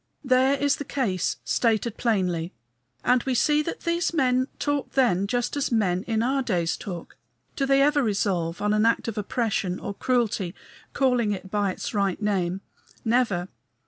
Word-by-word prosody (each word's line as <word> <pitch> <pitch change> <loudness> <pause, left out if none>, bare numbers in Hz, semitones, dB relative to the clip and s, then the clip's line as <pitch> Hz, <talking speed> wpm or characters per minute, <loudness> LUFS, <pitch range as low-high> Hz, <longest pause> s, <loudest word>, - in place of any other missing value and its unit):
There 260 +1 +4
is 285 0 +1
the - - -4
case 240 -10 -1
stated 230 -1 +1
plainly, 180 -7 0 0.5
and 250 0 +3
we 260 0 -1
see 295 +5 +3
that 320 - -5
these 340 0 0
men 255 -3 +2
talked 290 -2 -2
then 210 -8 +2
just 245 +4 -1
as 285 -2 -1
men 190 -6 +1
in 225 -1 +1
our 270 +3 +1
days 175 -9 0
talk. 175 -5 -8 0.4
Do 275 - 0
they 275 0 +5
ever 295 0 +3
resolve 195 -6 -1
on 210 0 +2
an 215 +1 +3
act 230 - +1
of 225 - -3
oppression 205 -4 -1
or - - -5
cruelty, 220 -6 0 0.4
calling 250 -6 +2
it 190 -1 -8
by 205 -2 +1
its 185 - -5
right 200 -3 0
name? 195 -3 -1 0.4
Never. 225 -7 +1
225 Hz, 170 wpm, -25 LUFS, 195-260 Hz, 0.5 s, they